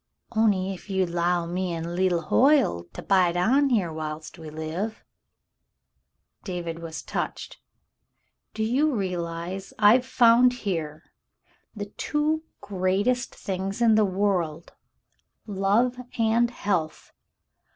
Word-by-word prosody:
On'y 205 -4 +2
ef 190 +2 -12
ye'd 190 -2 0
'low 175 0 +1
me 175 0 -2
an* 165 +1 -4
leetle 180 -2 +1
Hoyle 240 - +3
to - - -8
bide 180 -3 +3
on 270 +10 +3
here 195 -10 +1
whilst 155 +1 -6
we 160 -1 -8
live 160 +8 -5 0.5
— - - -55 0.2
" - - -51
David 170 -3 -5
was 165 -1 -7
touched. - - -5 1.0
"Do 220 - -1
you 270 +6 +1
realize 180 -1 -4
I've 220 +4 +6
found 245 -1 +5
here 165 -9 -4 0.7
the 205 -1 -4
two 300 +8 -1 0.2
greatest 200 +6 0
things 195 +2 -4
in 230 -2 +5
the 215 0 +4
world, 185 -5 -1 0.7
love 210 +5 +1 0.2
and 230 +1 +3
health 190 -9 -3
190 Hz, 120 wpm, -25 LUFS, 170-225 Hz, 1.0 s, I've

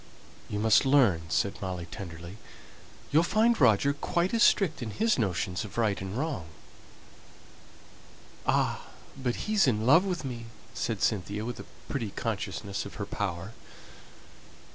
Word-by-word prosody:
"You 105 - -3
must 110 +3 +4
learn," 115 - +3
said 100 +4 0
Molly 90 -3 -4
tenderly. 85 +3 -8 0.7
"You'll 155 - +5
find 220 +4 +2
Roger 125 +3 +5
quite 170 +6 -1
as 230 - +2
strict 160 - +4
in 115 - -3
his 220 - +1
notions 90 -3 -1
of 105 - -9
right 110 -5 +1
and 95 +3 -5
wrong." 140 - -2 2.0
"Ah, - - +1 0.3
but 130 -3 -3
he's 210 -6 +3
in 110 -3 +1
love 160 +8 +6
with 180 -6 -3
me!" 120 -3 -6 0.3
said 110 -4 -2
Cynthia, 105 0 0
with 120 0 -5
a - - -8 0.2
pretty 120 -7 -2
consciousness 100 -1 -3
of - - -9
her 100 - -4
power. 95 -1 -4
110 Hz, 140 wpm, -29 LUFS, 95-145 Hz, 2.0 s, love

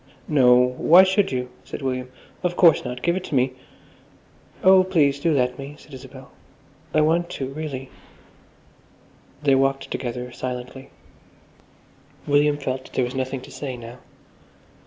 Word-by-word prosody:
"No, 130 -5 +5
why 125 +8 +5
should 195 +1 +1
you?" 125 -1 -3
said - - -8
William. 130 -1 -3 0.3
"Of 180 -1 -1
course, 170 -3 +5
not. 125 0 -6
Give 170 0 +2
it 185 - -3
to 145 - -4
me." 130 0 +2 1.1
"Oh, 190 0 +7
please, 150 -7 +2
do 165 +3 +1
let 125 -3 0
me," 140 +2 -8
said 150 - -17
Isabel. 130 - -12 0.6
"I 155 - +3
want 170 +3 +1
to, 135 -1 -4
really." 135 -3 -6 1.5
They 140 -2 +4
walked 135 0 +1
together 125 0 -4
silently. 125 +1 -7 1.4
William 145 0 +3
felt 130 -2 -5
there 130 - +1
was 125 - -6
nothing 130 0 -3
to - - -13
say 130 -4 -6
now. 120 +1 -11
135 Hz, 145 wpm, -23 LUFS, 125-155 Hz, 1.5 s, Oh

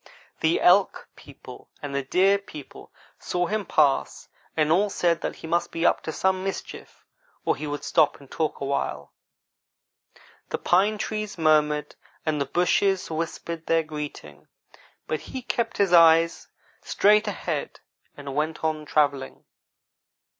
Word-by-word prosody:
The 160 +1 +2
Elk 190 +2 +3
people - - -13
and 145 -1 -6
the 140 - 0
Deer 190 +8 +3
people 155 -8 -12 0.3
saw 180 0 -1
him 210 +1 -2
pass, 145 -3 +1 0.3
and 155 -1 +2
all 200 +5 +3
said 170 -3 0
that - - -3
he - - -11
must 170 +2 0
be 165 +1 -2
up - - +3
to 160 - -5
some 190 +3 0
mischief 195 0 -7 0.4
or - - +2
he 155 - -6
would 145 0 -4
stop 155 -3 +2
and 140 -2 -17
talk 155 -1 -2
a 140 - -3
while. 140 0 -3 1.4
The - - -2
pine 200 +4 +2
trees 215 -1 -4
murmured, 150 -2 +2 0.3
and 155 -2 0
the 140 - -1
bushes 180 +4 +1
whispered 165 0 -5
their 165 0 +3
greeting, 150 - -8 0.6
but 155 - -2
he 260 -1 -7
kept 235 -1 -2
his 195 -3 +2
eyes 165 0 +5 0.3
straight 210 +2 +3
ahead 170 -7 -4 0.4
and 140 -1 -7
went 155 +3 -2
on 155 -1 -1
travelling. 140 -2 0
160 Hz, 145 wpm, -25 LUFS, 150-190 Hz, 1.4 s, eyes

